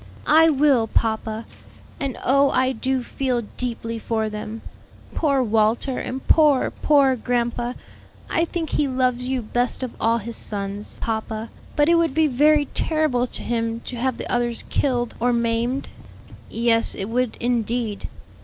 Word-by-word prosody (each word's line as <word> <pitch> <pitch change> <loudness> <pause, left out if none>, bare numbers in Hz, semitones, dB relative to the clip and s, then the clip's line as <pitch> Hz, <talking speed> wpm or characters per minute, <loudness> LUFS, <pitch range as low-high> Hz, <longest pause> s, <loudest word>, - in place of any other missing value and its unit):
'" 100 - -20
"I 320 +2 +6
will, 275 -6 +3
papa; 220 0 -1 0.5
and 275 -3 -3
oh, 275 +2 +4
I 255 0 +2
do 260 +1 -1
feel 250 -2 -1
deeply 230 -2 -4
for 220 -1 -1
them. 215 +1 -6 0.5
Poor 280 -5 +2
Walter 225 +3 +1
and 260 +1 -5
poor, 300 -5 +4
poor 280 -3 +3
grandpa. 240 0 -1 0.5
I 330 - +1
think 330 -2 -4
he 295 - +1
loves 255 -1 0
you 260 -2 -1
best 245 +4 -1
of 250 - -3
all 230 +1 +3
his 230 +1 -4
sons, 200 0 -5
papa; 220 0 -3 0.2
but 295 0 +3
it 335 0 +5
would 325 -5 0
be 320 0 +4
very 295 +2 +4
terrible 305 -6 +1
to - - -6
him 230 -1 -1
to 250 - -7
have 255 +1 -1
the - - -5
others 240 -1 +1
killed 245 -4 0
or 245 +2 +2
maimed." 235 +3 0 0.6
"Yes, 230 0 +2
it 195 - -3
would 245 +1 -1
indeed. 235 -2 -1
245 Hz, 155 wpm, -22 LUFS, 230-270 Hz, 0.6 s, I